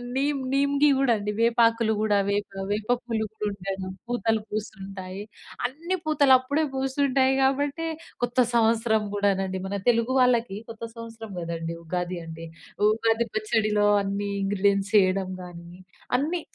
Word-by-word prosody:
Neem 280 +1 +1
నీమ్‌‌గి 280 +1 +3
కూడా 270 -3 +3
అండి. 210 0 -3
వేపాకులు 230 -1 +3
కూడా 210 -1 +2
వేప 205 0 0 0.2
వేప 210 +1 -2 0.2
పూలు 220 -2 -1 0.2
కూడాను 195 -2 -3 0.2
పూతలు 230 -2 +1
పూస్తుంటాయి. 195 -2 -6 0.4
అన్ని 325 +9 -2
పూతలు 285 -3 +4
అప్పుడే 285 +5 -1
పూస్తుంటాయి 265 0 +2
కాబట్టే 285 +4 +1 0.4
కొత్త 245 +1 -2 0.2
సంవత్సరం 225 -1 +3
కూడానండి, 195 -2 0
మన 200 +1 -2
తెలుగు 230 +2 +2
వాళ్ళకి 240 -5 +3
కొత్త 230 0 -9
సంవత్సరం 225 -2 -9
కదండీ! 165 -1 -4
ఉగాది 180 +1 -3
అంటే. 165 0 -8 0.4
ఉగాది 225 +1 +2
పచ్చడిలో 215 -1 +1 0.2
అన్ని 200 +1 -2
ఇంగ్రీడియెంట్స్ 200 0 +1
చేయడం 190 -1 +3
గాని 170 -1 -10 0.5
అన్ని 325 +6 -1
220 Hz, 125 wpm, -26 LUFS, 195-255 Hz, 0.5 s, పూతలు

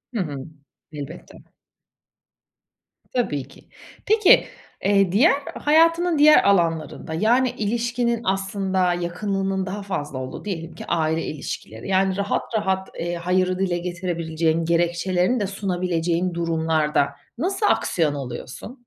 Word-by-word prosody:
Hı - - 0
hı. 150 -5 -4 0.6
Elbette. 150 +2 -9 1.8
Tabii 145 - -1
ki. 140 - -17 0.4
Peki, 435 +2 +5 0.4
eee, 195 -2 +3
diğer, 260 - +5 0.2
hayatının 330 +2 +3
diğer 305 +1 +7
alanlarında, 165 -4 +1
yani, 240 +9 +3
ilişkinin 235 +2 0
aslında 190 -1 0
yakınlığının 190 +2 -2
daha 200 +2 -5
fazla 150 -8 -4
olduğu, 130 +8 -6
diyelim 165 -5 -5
ki - - -8
aile 160 -1 0
ilişkileri, 110 - -6
yani 190 0 +2
rahat 200 0 0 0.2
rahat, 190 -2 -1
eee, 175 +1 -2
hayırı 185 +1 0
dile 180 -2 0
getirebileceğin, 170 -2 -1
gerekçelerini 175 +6 +1
de 205 - -1
sunabileceğin 180 -3 -1
durumlarda 160 -3 +1 0.3
nasıl 385 - -1
aksiyon 160 - +2
alıyorsun? 130 - -7
185 Hz, 115 wpm, -23 LUFS, 165-205 Hz, 1.8 s, diğer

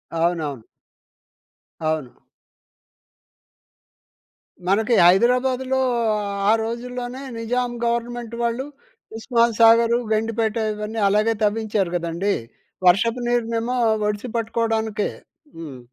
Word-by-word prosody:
అవునవును. 160 -8 -1 1.2
అవును. 155 -5 -2 2.5
మనకి 220 +5 +2
హైదరాబాదులో, 250 +6 +3 0.7
ఆ - - +6
రోజుల్లోనే 245 +2 -5 0.2
నిజాం 245 +2 -1
గవర్నమెంట్ 235 0 -2
వాళ్ళు, 235 +3 -1 0.5
ఉస్మాన్ 235 -1 +1
సాగర్, 230 +1 +6 0.2
గండిపేట 225 0 0 0.2
ఇవన్నీ 210 +1 -5
అలాగే 215 +3 +2
తవ్వించారు 210 -3 0
కదండీ! 170 +4 -1 0.5
వర్షపు 230 +7 +3
నీరునేమో 235 0 0 0.3
ఒడిసి 210 +4 -3
పట్టుకోవడానికే. 225 -2 -1 0.5
హ్మ్. 145 -6 -8
225 Hz, 80 wpm, -22 LUFS, 205-240 Hz, 2.5 s, ఆ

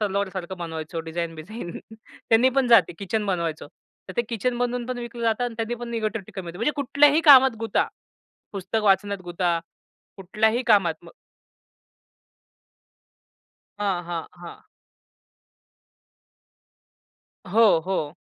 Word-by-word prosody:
तलवारसारखं 190 -3 -3
बनवायचो 165 -1 -5
डिझाइन 165 +1 -4
बिझाइन 175 +2 -8 0.2
त्यांनी 225 +2 +1
पण 260 -3 +3
जाते. 210 -9 +5
किचन 205 +2 -2
बनवायचो. 170 -5 -2 0.4
तर - - -6
ते 240 - +2
किचन 240 +2 -2
बनवून 245 -1 -2
पण 255 -1 -4
विकलं 235 0 -7
जातं 230 +2 +1
अन् 240 -2 -4
त्यांनी 225 +1 -2
पण 240 0 -7
निगेटिव्हिटी 215 -3 -3
कमी 175 - -11
होते. 170 +2 -8
म्हणजे 265 +7 +1
कुठल्याही 285 +3 +4
कामात 260 -3 +7
गुता. 225 -2 0 0.7
पुस्तक 200 +3 -2
वाचण्यात 200 0 +2
गुता, 175 -1 0 0.6
कुठल्याही 220 +6 0
कामात 195 -7 +4
मग - - -14 2.7
हां, 195 -4 -1
हां, 170 -1 -5
हां. 170 - -11 2.8
हो, 215 -1 +4
हो. 155 -5 -2
205 Hz, 120 wpm, -24 LUFS, 175-235 Hz, 2.8 s, कामात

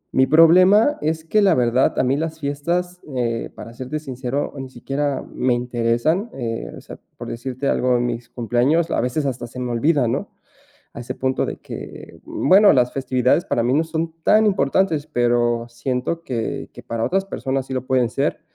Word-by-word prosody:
mi 130 0 +4
problema 185 - +6
es 160 +1 -2
que 210 +6 +2
la 195 -4 +4
verdad, 125 +1 +2
a - - +3
mí 135 +3 +1
las 160 0 -3
fiestas, 170 +6 -2
eh, 115 -2 -1
para 115 - -10
serte 130 +5 -5
sincero, 130 -1 -4
ni 135 -1 -6
siquiera 135 +2 -3
me 125 -1 +1
interesan, 120 - 0
eh, 115 -3 -4
o - - -11
sea, - - -11 0.2
por - - -7
decirte 130 +3 -4
algo, 125 0 +2
de - - +2
mis 120 -1 -3
cumpleaños 130 +8 +1
a - - +1
veces 125 +5 -1
hasta 130 -3 -3
se 125 +2 -9
me 125 -1 -3
olvidan, 125 0 +2
¿no?, 195 +9 -3 0.7
a - - -8
ese 120 - -5
punto 130 0 -1
de - - -5
que - - -9
bueno, 200 +7 +5
las 125 -1 +2
festividades 130 +3 +1
para 115 - 0
mí 120 - +1
no 160 +3 +2
son 160 0 -3
tan 215 +1 +5
importantes, 160 -3 +1
pero, 120 -3 +1
siento 125 +7 -3
que 115 -6 -4
que - - -12
para 115 -1 -3
otras 195 +1 0
personas 135 -7 -3
sí 135 - -7
lo 130 0 -3
pueden 130 -2 +2
ser. 140 +4 -1
130 Hz, 190 wpm, -21 LUFS, 120-160 Hz, 0.7 s, problema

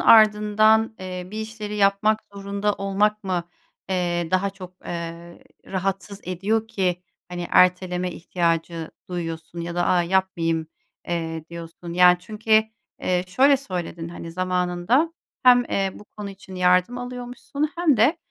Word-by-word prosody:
ardından, 215 0 +5
eee, 185 -1 -5
bir 215 +1 -4
işleri 215 -1 -5
yapmak 205 +2 +3
zorunda 200 +1 -1
olmak 205 +2 0
mı, 180 -2 -2 0.4
eee, 175 -2 0
daha 185 +2 +2
çok, 185 -2 -11
eee, 170 0 -6 0.3
rahatsız 195 +1 -3
ediyor 205 +5 -1
ki, 180 -4 -1 0.3
hani, 175 -1 -4
erteleme 180 0 +3
ihtiyacı 165 -1 -1 0.2
duyuyorsun 165 -1 -5
ya 170 0 -4
da 175 0 +1
"A, 180 -1 +3
yapmayayım." 170 -3 0 0.4
eee, 165 -2 -3
diyorsun? 170 0 -8
Yani 180 0 +6
çünkü, 215 +2 +2 0.4
eee, 180 0 +1
şöyle 270 +10 +5
söyledin, 175 -8 -5
hani, 170 -1 -8
zamanında 180 - +1 0.3
hem, 245 -1 +7
eee, 195 -4 0
bu - - -12
konu 205 -1 -5
için 195 -1 -12
yardım 180 +6 +3
alıyormuşsun 250 +4 -4
hem 335 -6 +3
de 240 +10 +4
185 Hz, 135 wpm, -24 LUFS, 175-215 Hz, 0.4 s, hem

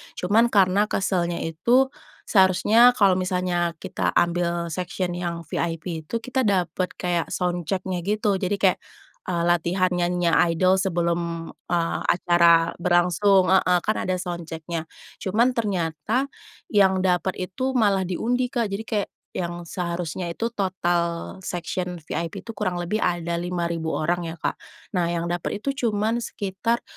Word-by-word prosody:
Cuman, 215 +6 +3
karena 200 -1 +3
keselnya 175 -4 -1
itu, 240 +12 +2 0.3
seharusnya 215 +5 +5
kalau 190 -3 +4
misalnya 180 -2 0
kita 95 - -3
ambil 170 -1 +1
section 180 +1 -3
yang 175 -1 -4
VIP 165 -1 -4
itu - - -4
kita 255 -2 0
dapet 185 -1 0
kayak 175 -2 -1
sound 175 -2 -2
check-nya 185 -1 -2
gitu. 210 -2 +1
Jadi, 195 +1 0
kayak 190 -2 +2 0.5
eee, 170 -2 0
latihan 175 +2 +2
nyanyinya 175 -1 +1 0.2
idol 185 +3 +3
sebelum, 170 -2 -1 0.2
eee, 170 -1 0
acara 170 -1 +4
berlangsung 180 +2 +3
heeh. 180 -1 +4
Kan 215 - +1
ada 185 - 0
sound 175 -2 -5
check-nya. 160 0 -5 0.3
Cuman, 225 +6 +2
ternyata 200 - -1 0.5
yang 190 -2 +4
dapet 180 0 +1
itu 255 +9 -3
malah 200 -4 +3
diundi 245 +7 0
Kak, 240 -3 0
jadi 205 +3 -3
kayak 210 -2 -1 0.2
yang 175 -1 -4
seharusnya 170 0 -4
itu 225 +8 -2
total 175 -5 -1
section 180 0 -4
VIP 165 +2 -4
itu 230 - -6
kurang 185 -4 -2
lebih 195 +6 -1
ada 170 -2 -1
5.000 170 -2 -2
orang 175 +2 0
ya, 165 - -5
Kak. - - -1 0.4
Nah, 170 -1 +2
yang 170 0 -1
dapet 175 +4 -3
itu 275 - -1 0.2
cuman 215 +2 0
sekitar 230 +2 -2
180 Hz, 140 wpm, -24 LUFS, 170-200 Hz, 0.5 s, seharusnya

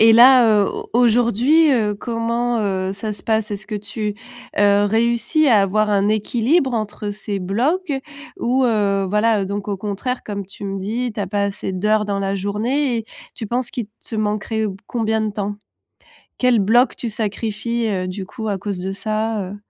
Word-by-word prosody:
et 225 +1 +8
là, 235 -3 +7
heu, - - -1
au - - -6
aujourd'hui, 245 +6 +4
heu, 215 -5 +1
comment, 235 +2 -1
heu, 190 -3 -1
ça 210 +2 -4
se 200 - -7
passe? 220 -1 0
Est-ce 200 - -4
que 215 - -3
tu, 210 0 -4 0.4
heu, 205 0 +4
réussis 235 +8 +2
à 225 -6 +6
avoir 210 +2 +1
un 200 -1 +2
équilibre 240 +6 +1
entre 210 -1 -3
ces 205 -1 -4
blocs 270 - 0 0.5
ou 260 0 +2
heu, 205 -4 +2
voilà, 210 +1 +2
heu, - - -2
donc 200 +1 -4
au 200 - -1
contraire 210 +6 -3
comme 200 -2 -5
tu 200 +1 -10
me 195 0 -3
dis: 230 +5 -2
«Tu 210 - -4
as 195 - -2
pas 205 0 0
assez 200 -1 -3
d'heures 210 +3 +1
dans 200 -1 -1
la 195 0 -1
journée» 230 +7 0
et 225 - -5 0.3
tu 220 - -5
penses 240 +2 -2
qu'il 240 -4 -4 0.2
te 225 - -6
manquerait 215 +1 -1 0.2
combien 220 -2 0
de 215 -1 -1
temps? 205 0 -3 0.8
Quel 250 -3 +3
bloc 235 +6 +3
tu 235 - -3
sacrifies, 220 +2 -2
heu, 185 -3 -1
du 190 +1 -5
coup, 220 +2 -5
à 200 - -1
cause 195 0 -4
de 190 +2 -3
ça, 215 +2 -2
heu - - -7
215 Hz, 190 wpm, -20 LUFS, 200-235 Hz, 0.8 s, et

